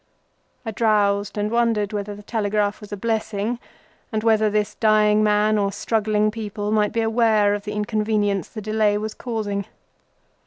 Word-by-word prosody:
I 225 Hz, -, -3 dB
drowsed, 205 Hz, -2 st, +1 dB
and 210 Hz, +1 st, -1 dB
wondered 230 Hz, -3 st, +1 dB
whether 205 Hz, 0 st, -4 dB
the 205 Hz, -, -12 dB
telegraph 205 Hz, -1 st, -1 dB
was 210 Hz, -, -11 dB
a 205 Hz, -, -4 dB
blessing, 220 Hz, +1 st, -2 dB, 0.5 s
and 215 Hz, -1 st, -2 dB
whether 220 Hz, -1 st, +3 dB
this 210 Hz, 0 st, 0 dB
dying 215 Hz, -1 st, +3 dB
man, 210 Hz, 0 st, +3 dB
or 200 Hz, -1 st, 0 dB
struggling 215 Hz, +1 st, 0 dB
people, 210 Hz, -1 st, -4 dB
was 210 Hz, 0 st, +1 dB
aware 225 Hz, -2 st, +3 dB
of 205 Hz, 0 st, -4 dB
the 210 Hz, -, -4 dB
inconvenience 210 Hz, -2 st, 0 dB
the 215 Hz, -, -8 dB
delay 215 Hz, -1 st, +1 dB
was 215 Hz, +1 st, -4 dB
causing. 210 Hz, -4 st, -3 dB
210 Hz, 155 wpm, -22 LUFS, 205-220 Hz, 0.5 s, whether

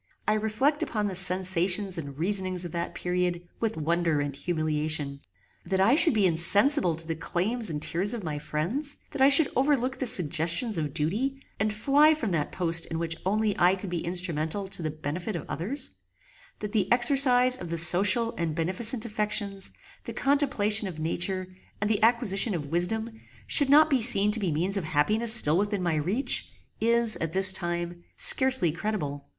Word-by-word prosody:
I 215 Hz, -, +2 dB
reflect 220 Hz, +8 st, -1 dB
upon 210 Hz, -2 st, -3 dB
the 200 Hz, -, -4 dB
sensations 185 Hz, 0 st, +1 dB
and 140 Hz, -3 st, -9 dB
reasonings 185 Hz, +1 st, 0 dB
of 170 Hz, -, -8 dB
that 170 Hz, 0 st, -5 dB
period 180 Hz, -1 st, -3 dB
with 225 Hz, -4 st, -3 dB
wonder 165 Hz, 0 st, -1 dB
and 145 Hz, -1 st, -4 dB
humiliation. 155 Hz, -3 st, -3 dB, 0.4 s
That 190 Hz, -1 st, -3 dB
I 200 Hz, +6 st, +3 dB
should 310 Hz, -2 st, +3 dB
be 205 Hz, -3 st, +2 dB
insensible 185 Hz, -, +2 dB
to 165 Hz, +1 st, -7 dB
the 165 Hz, -, -4 dB
claims 195 Hz, +8 st, -3 dB
and 150 Hz, -2 st, -4 dB
tears 180 Hz, +7 st, +3 dB
of 220 Hz, -, -8 dB
my 150 Hz, -3 st, -5 dB
friends; 175 Hz, -, -4 dB
that 275 Hz, -, -6 dB
I 270 Hz, -, +6 dB
should 285 Hz, +1 st, +4 dB
overlook 265 Hz, -1 st, -1 dB
the 260 Hz, -, -1 dB
suggestions 170 Hz, -, +2 dB
of 150 Hz, -2 st, -4 dB
duty, 220 Hz, -, -2 dB, 0.2 s
and 215 Hz, +1 st, -1 dB
fly 285 Hz, +8 st, +2 dB
from 230 Hz, -10 st, -4 dB
that 155 Hz, -4 st, -3 dB
post 170 Hz, -2 st, -2 dB
in 160 Hz, -, -5 dB
which 165 Hz, 0 st, -3 dB
only 210 Hz, +1 st, -1 dB
I 180 Hz, +2 st, +3 dB
could 195 Hz, -1 st, -9 dB
be 170 Hz, -2 st, -4 dB
instrumental 175 Hz, +1 st, -1 dB
to 190 Hz, -, -4 dB
the 155 Hz, -, -3 dB
benefit 155 Hz, +6 st, -6 dB
of 165 Hz, -, -7 dB
others; 255 Hz, -, -6 dB, 0.7 s
that 210 Hz, -1 st, -5 dB
the 200 Hz, -4 st, -2 dB
exercise 250 Hz, 0 st, +4 dB
of 175 Hz, -, -8 dB
the 170 Hz, -, -4 dB
social 195 Hz, +7 st, +4 dB
and 165 Hz, -2 st, -3 dB
beneficent 215 Hz, +8 st, 0 dB
affections, 210 Hz, -3 st, -3 dB, 0.3 s
the -, -, -7 dB
contemplation 240 Hz, -7 st, +1 dB
of 175 Hz, -4 st, -8 dB
nature 185 Hz, +4 st, -3 dB, 0.3 s
and 205 Hz, -, -2 dB
the 215 Hz, -1 st, -1 dB
acquisition 225 Hz, -3 st, +1 dB
of 155 Hz, -4 st, -5 dB
wisdom 220 Hz, +9 st, -3 dB, 0.2 s
should 285 Hz, -3 st, +2 dB
not 305 Hz, +2 st, +5 dB
be 270 Hz, -5 st, 0 dB
seen 210 Hz, -3 st, +7 dB
to 225 Hz, -, 0 dB
be 190 Hz, -5 st, -2 dB
means 180 Hz, +7 st, -2 dB
of 195 Hz, -, -3 dB
happiness 210 Hz, +10 st, 0 dB
still 175 Hz, -8 st, +5 dB
within 205 Hz, -2 st, -3 dB
my 170 Hz, -2 st, -1 dB
reach, 185 Hz, -, -2 dB, 0.3 s
is, 235 Hz, -1 st, +2 dB
at 165 Hz, -1 st, -5 dB
this 190 Hz, 0 st, +4 dB
time, 175 Hz, -1 st, -5 dB
scarcely 260 Hz, -11 st, +5 dB
credible. 150 Hz, -6 st, -5 dB
190 Hz, 180 wpm, -25 LUFS, 170-225 Hz, 0.7 s, seen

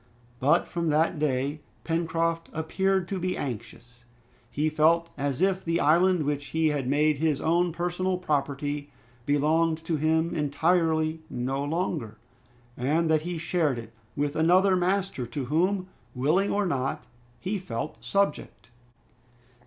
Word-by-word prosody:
But 140 Hz, +4 st, +3 dB
from 170 Hz, -1 st, -2 dB
that 155 Hz, +1 st, +2 dB
day 145 Hz, +1 st, -1 dB, 0.2 s
Pencroft 165 Hz, 0 st, -1 dB
appeared 190 Hz, +3 st, 0 dB
to 195 Hz, -, -2 dB
be 180 Hz, +1 st, -2 dB
anxious. 125 Hz, 0 st, -7 dB, 0.5 s
He 150 Hz, +5 st, 0 dB
felt 160 Hz, +2 st, +3 dB
as 140 Hz, +3 st, -1 dB
if 190 Hz, -1 st, +1 dB
the 165 Hz, 0 st, 0 dB
island 175 Hz, +3 st, +4 dB
which 145 Hz, 0 st, -2 dB
he 160 Hz, -1 st, +3 dB
had 140 Hz, -4 st, -1 dB
made 150 Hz, +1 st, +2 dB
his 155 Hz, -3 st, +1 dB
own 170 Hz, +2 st, +2 dB
personal 180 Hz, +2 st, -1 dB
property 145 Hz, -3 st, -2 dB, 0.4 s
belonged 160 Hz, +3 st, +2 dB
to 165 Hz, -1 st, 0 dB
him 160 Hz, +2 st, +1 dB
entirely 160 Hz, +1 st, +1 dB
no 130 Hz, +3 st, -2 dB
longer, 145 Hz, -, -2 dB, 0.6 s
and 160 Hz, +6 st, +1 dB
that 155 Hz, -1 st, +3 dB
he 175 Hz, +1 st, -4 dB
shared 160 Hz, -5 st, 0 dB
it 115 Hz, -1 st, -9 dB, 0.2 s
with 145 Hz, +1 st, -1 dB
another 185 Hz, +4 st, +4 dB
master, 185 Hz, -7 st, 0 dB
to 130 Hz, +3 st, -4 dB
whom, 180 Hz, +7 st, +1 dB, 0.3 s
willing 155 Hz, +10 st, +2 dB
or 205 Hz, 0 st, +1 dB
not, 135 Hz, -5 st, -1 dB, 0.4 s
he 200 Hz, +7 st, -2 dB
felt 130 Hz, -5 st, -5 dB
subject. 195 Hz, -, -1 dB
160 Hz, 135 wpm, -27 LUFS, 145-175 Hz, 0.6 s, island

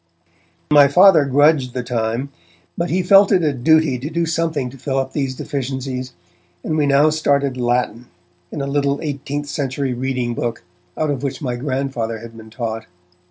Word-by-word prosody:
My 145 Hz, -1 st, +7 dB
Father 170 Hz, 0 st, +6 dB
grudged 140 Hz, -2 st, +3 dB
the 125 Hz, -, -2 dB
time, 120 Hz, +2 st, -2 dB, 0.5 s
but 170 Hz, +1 st, -2 dB
he 185 Hz, +1 st, 0 dB
felt 195 Hz, +2 st, +6 dB
it 185 Hz, -4 st, +3 dB
a 150 Hz, -2 st, +1 dB
duty 145 Hz, 0 st, +2 dB
to 140 Hz, +5 st, -5 dB
do 170 Hz, +1 st, -1 dB
something 160 Hz, -5 st, -1 dB
to 135 Hz, -, -13 dB
fill 135 Hz, +1 st, -2 dB
up 135 Hz, 0 st, -2 dB
these 135 Hz, -3 st, -2 dB
deficiencies, 130 Hz, -1 st, -4 dB, 0.5 s
and 155 Hz, -, -2 dB
we 150 Hz, -2 st, +1 dB
now 140 Hz, +2 st, +4 dB
started 140 Hz, -3 st, +1 dB
Latin, 120 Hz, -1 st, -1 dB, 0.4 s
in 145 Hz, -, -4 dB
a -, -, -2 dB
little 140 Hz, 0 st, 0 dB
eighteenth 145 Hz, 0 st, -4 dB
century 135 Hz, -2 st, -2 dB
reading 125 Hz, -1 st, -2 dB
book, 115 Hz, -2 st, -4 dB, 0.3 s
out 155 Hz, -1 st, 0 dB
of 135 Hz, -3 st, -3 dB
which 140 Hz, -1 st, -3 dB
my 125 Hz, -5 st, -3 dB
Grandfather 130 Hz, -3 st, -3 dB
had 115 Hz, +1 st, -11 dB
been 110 Hz, -1 st, -12 dB
taught. 115 Hz, -1 st, -5 dB
135 Hz, 175 wpm, -19 LUFS, 125-150 Hz, 0.5 s, My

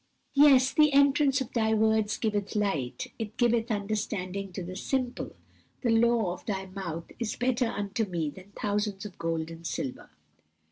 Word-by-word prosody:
"Yes, 275 Hz, -3 st, +6 dB
'the 300 Hz, -2 st, +5 dB
entrance 280 Hz, 0 st, +4 dB
of 260 Hz, -, -5 dB
Thy 220 Hz, -2 st, +2 dB
words 220 Hz, -1 st, +2 dB
giveth 205 Hz, -2 st, -1 dB
light, 200 Hz, -, -1 dB
it 220 Hz, 0 st, -5 dB
giveth 235 Hz, -1 st, +2 dB
understanding 200 Hz, -2 st, -2 dB
to 185 Hz, -, -4 dB
the 185 Hz, +1 st, -7 dB
simple.' 255 Hz, +5 st, -2 dB, 0.5 s
'The 240 Hz, -, +3 dB
law 225 Hz, -4 st, +3 dB
of 180 Hz, -, -11 dB
Thy 195 Hz, -3 st, -2 dB
mouth 185 Hz, -4 st, -6 dB
is 230 Hz, -3 st, -2 dB
better 250 Hz, 0 st, +1 dB
unto 205 Hz, 0 st, -2 dB
me 170 Hz, -6 st, -2 dB
than 185 Hz, +7 st, -14 dB
thousands 205 Hz, -1 st, -1 dB
of 200 Hz, -4 st, -9 dB
gold 165 Hz, -1 st, -2 dB
and 165 Hz, 0 st, -7 dB
silver.'" 130 Hz, -, -4 dB
210 Hz, 160 wpm, -28 LUFS, 190-240 Hz, 0.5 s, Yes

